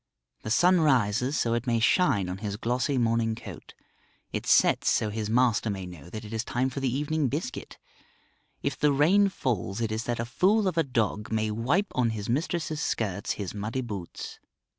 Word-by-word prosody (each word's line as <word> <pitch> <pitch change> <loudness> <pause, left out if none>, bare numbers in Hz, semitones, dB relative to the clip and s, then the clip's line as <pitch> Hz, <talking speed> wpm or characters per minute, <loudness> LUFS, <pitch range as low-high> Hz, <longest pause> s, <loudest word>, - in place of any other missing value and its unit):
The - - -6
sun 175 +9 +4
rises 125 -2 +2
so 115 - +1
it 120 +2 -2
may 115 -1 +2
shine 115 - +3
on 90 +1 -5
his 100 -1 -4
glossy 125 +5 0
morning 115 -1 +1
coat; 115 - -11 0.6
it - - -3
sets - - +4
so 105 - +1
his 105 0 -3
master 115 -1 +2
may 95 -2 -4
know 85 -2 -11
that 110 +3 -7
it 105 - -8
is 110 0 -1
time 125 +2 -1
for 140 - -4
the 135 -2 0
evening 150 +2 0
biscuit; 140 0 -5 0.9
if - - -1
the 150 0 +2
rain 180 +9 +4
falls 115 - -2
it 115 -2 -1
is 110 +2 -2
that 120 -1 -2
a 115 - -1
fool 195 - +2
of 185 - -1
a 165 - +3
dog 110 -5 -1
may 110 -1 0
wipe 140 - 0
on 125 -2 +2
his 105 -2 -4
mistress's 155 +3 -1
skirts 100 - -1
his 100 -3 -5
muddy 110 +5 -3
boots. 100 -8 -7
120 Hz, 195 wpm, -27 LUFS, 110-145 Hz, 0.9 s, sun